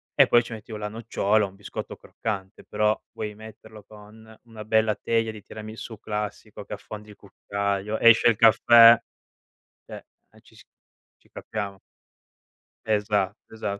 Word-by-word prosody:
e - - +6
poi 120 - +5
ci 115 - -9
metti 110 +1 -10
o 105 - -5
la 105 0 -4
nocciola 110 -1 0
o - - -7
un 95 - -19
biscotto 100 -1 -8
croccante, 100 -3 -6
però 105 +1 0
vuoi 105 -1 -6
metterlo 110 -1 -13
con 110 +1 -16
una 110 -2 -11
bella 110 -1 +2
teglia 115 +1 -1
di 110 - -11
tiramisù 110 +1 -9
classico 105 -1 -6
che - - -8
affondi 105 +1 -9
il 105 - -13
cucchiaio, 100 +1 -4
esce 115 0 +6
il 115 - +2
caffè, 115 +1 +7 0.9
cioè, - - -10 0.3
eh - - -21
ci - - -22
s - - -18 0.5
ci - - -30
capiamo. 100 -3 -6 1.1
Esa 105 -2 0
esa 100 -2 -5
105 Hz, 155 wpm, -25 LUFS, 105-110 Hz, 1.1 s, caffè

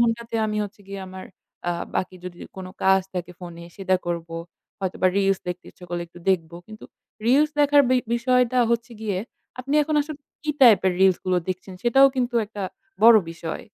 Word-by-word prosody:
ঘণ্টাতে 235 0 0
আমি 215 0 -2
হচ্ছে 205 0 -11
গিয়ে 195 0 -6
আমার 185 0 -9 0.4
আ - - +1 0.2
বাকি 185 - -2
যদি 175 -1 -8 0.2
কোন 190 - -6 0.2
কাজ 190 0 +5
থাকে 180 0 -4
ফোনে 170 -1 -9
সেটা 190 -1 +1
করব। 170 -1 -3 0.5
হয়তোবা 185 0 0
রিলস 195 -1 +2
দেখতে 180 0 -5
ইচ্ছা 180 - -15
করলে 175 0 -3
একটু 175 - -14
দেখব। 170 -4 +1 0.2
কিন্তু 215 0 -11 0.4
রিলস 290 +5 +4
দেখার 290 0 +6
বি 255 - +5 0.2
বিষয়টা 250 +1 +2
হচ্ছে 235 +1 -1
গিয়ে, 205 -4 -2 0.4
আপনি 275 +3 -3
এখন 305 +1 -2
আসলে 295 0 -5 0.2
কি 305 - -1
টাইপ 225 -7 +8
এর 185 - +3
রিলস 190 -2 +5
গুলো 185 -1 +1
দেখছেন 185 +1 -5
সেটাও 270 +3 +6
কিন্তু 245 -1 -1
একটা 205 -1 -7 0.4
বড় 230 0 +9
বিষয়। 165 -1 -6
200 Hz, 185 wpm, -24 LUFS, 185-240 Hz, 0.5 s, বড়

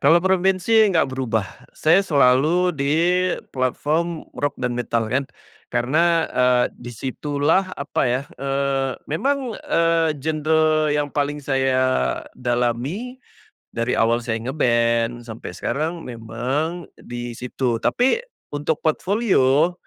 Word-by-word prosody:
Kalo 160 +5 +6
preferensi 190 +2 +2 0.2
engga 165 -4 +3
berubah. 125 -6 -3
Saya 165 +5 +4
selalu 155 +2 +3
di 140 0 0 0.6
platform 155 +6 -1
rock 145 -1 -2
dan 125 -1 -2
metal 120 -1 -1
kan, 135 +1 0 0.4
karena, 160 +7 +2
eee, 125 -1 +3
di 120 - -11
situlah 145 - 0
apa 140 - -2
ya, 125 +3 0 0.2
eee, 135 -1 0 0.2
memang, 265 - 0
eee, 165 -1 +2
genre 155 +1 +1
yang 145 -1 -1
paling 145 0 -1
saya 130 -1 +1
dalami 125 - -2 0.5
dari 115 +1 -1
awal 115 +1 +2
saya 115 -1 -2
nge-band 120 -2 0
sampai 115 0 -8
sekarang, 160 +3 -3
memang 130 +9 -3
di 120 0 -7
situ. 125 -1 -2
Tapi, 265 - +2 0.3
untuk 145 +2 -2
portfolio 175 - +2
140 Hz, 115 wpm, -22 LUFS, 125-165 Hz, 0.6 s, Kalo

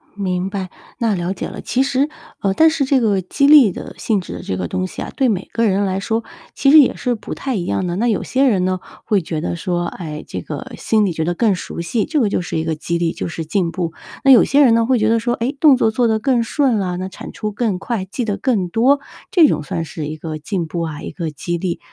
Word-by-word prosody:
明 185 -2 -2
白， 195 -2 -4 0.3
那 230 -5 +1
了 175 0 -2
解 185 - -5
了。 - - -8
其 255 - 0
实 270 +2 +1 0.3
呃， 195 -1 +1
但 320 +9 +5
是 315 -2 0
这 270 0 +3
个 205 -5 +1
激 230 +10 +1
励 285 -8 +8
的 - - -8
性 215 -3 0
质 180 - -7
的 - - -7
这 95 - -3
个 90 -1 -2
东 185 - -2
西 185 - -7
啊， - - -5
对 265 -2 +2
每 195 -4 -2
个 230 - +1
人 200 -1 +2
来 190 0 -1
说， 225 +2 -1 0.3
其 275 - +3
实 310 - +9
也 275 - +4
是 245 -1 -1
不 215 - -7
太 265 -3 -3
一 185 - -1
样 180 +1 -1
的。 175 - -2
那 235 +5 +1
有 215 - +1
些 265 +2 0
人 200 -9 +3
呢， 185 0 0 0.3
会 210 -4 +2
觉 160 -1 -4
得 165 - -3
说， 175 0 -2
哎， 155 -5 -6
这 - - -5
个 - - -7
心 215 -2 +2
里 185 - -1
觉 160 - -2
得 175 +2 0
更 215 -3 +2
熟 175 - -7
悉， 185 +6 -1
这 310 -2 0
个 225 - +3
就 200 - 0
是 175 - -4
一 160 - -1
个 160 -1 -1
激 170 +2 -2
励， 170 -1 0
就 - - -4
是 165 -1 -5
进 170 +1 0
步。 170 -3 -3 0.3
那 270 - +8
有 250 - +8
些 285 +2 +3
人 245 -5 +6
呢 230 0 +3
会 255 -1 +2
觉 215 - +2
得 230 +1 +3
说， 240 +1 0
诶， 245 +5 -2
动 280 -3 +6
作 220 - +3
做 240 +2 +1
得 220 -1 +1
更 245 0 +2
顺 255 -1 +1
了， 180 -2 -2
那 185 +1 -3
产 190 - -9
出 210 -1 -4
更 205 -4 -1
快， 210 0 -3
记 210 +6 -4
得 205 -2 -1
更 215 -9 0
多， 245 +10 +3 0.3
这 350 -8 +6
种 150 - -1
算 165 +2 -3
是 155 -1 -6
一 155 +1 -5
个 155 0 -5
进 170 +2 -3
步 170 +2 -3
啊， 160 -3 -4
一 - - -6
个 165 -4 -4
激 170 +4 -3
励。 170 0 -3
200 Hz, 300 characters per minute, -19 LUFS, 175-240 Hz, 0.3 s, 实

